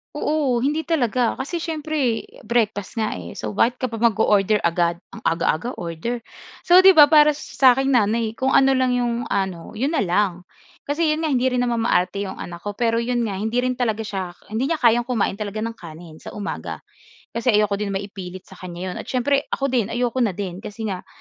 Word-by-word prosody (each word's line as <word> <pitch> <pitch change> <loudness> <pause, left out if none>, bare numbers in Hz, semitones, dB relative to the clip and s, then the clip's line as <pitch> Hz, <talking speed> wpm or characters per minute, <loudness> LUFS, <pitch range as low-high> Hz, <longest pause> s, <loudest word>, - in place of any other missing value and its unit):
Oo 290 -5 0
hindi 300 +2 -1
talaga. 250 -7 +1
Kasi 340 +5 -4
siyempre 310 -7 -1 0.2
breakfast 220 -4 0
nga 220 -2 -1
eh, 85 -1 -9
so 110 - -4
bakit 240 - +2
ka 255 - -1
pa 225 - -5
mag-o-order 215 -2 +3
agad. 170 0 +1 0.2
Ang - - -9
aga-aga 165 +7 0
order? 175 +9 -4 0.4
So 355 +1 +7
'di 380 0 +7
ba 295 -1 +8
para 300 -1 +6
sa 265 -3 +3
aking 270 +1 0
nanay 225 -2 +2
kung 260 +4 0
ano 270 0 +5
lang 255 -1 +2
'yong 240 -1 -1
ano, 190 -1 -3
'yon 265 +7 -1
na 320 - +1
lang. 180 -1 0 0.4
Kasi 295 +4 0
'yon 305 - -1
nga 320 - -1
hindi 260 -3 +1
rin 250 - 0
naman 235 -2 0
maarte 190 -2 +1
'yong 190 - -7
anak 170 -1 -8
ko, 205 - -3
pero 230 -1 +2
'yon 235 0 0
nga 195 - -3
hindi 220 +5 -1
rin 255 0 0
talaga 225 -3 -1
siya 190 -4 -4 0.2
hindi 250 +9 -2
niya 320 - 0
kayang 240 -1 +4
kumain 235 -5 -1
talaga 210 0 -5
ng 230 +1 -3
kanin 165 -2 -11
sa - - -10
umaga. 205 - -5 0.5
Kasi 235 +2 -4
ayoko 205 -1 +2
din 200 -2 -2
maipilit 190 -2 -6
sa 190 - -16
kanya 180 0 -6
'yon. - - -7
At - - -8
siyempre 275 +2 +1
ako 275 -1 -2
din 235 -5 +1
ayoko 240 +2 -1
na 215 -7 +1
din 190 -3 -5
kasi 215 +2 -8
nga, 185 - -7
230 Hz, 210 wpm, -22 LUFS, 200-255 Hz, 0.5 s, ba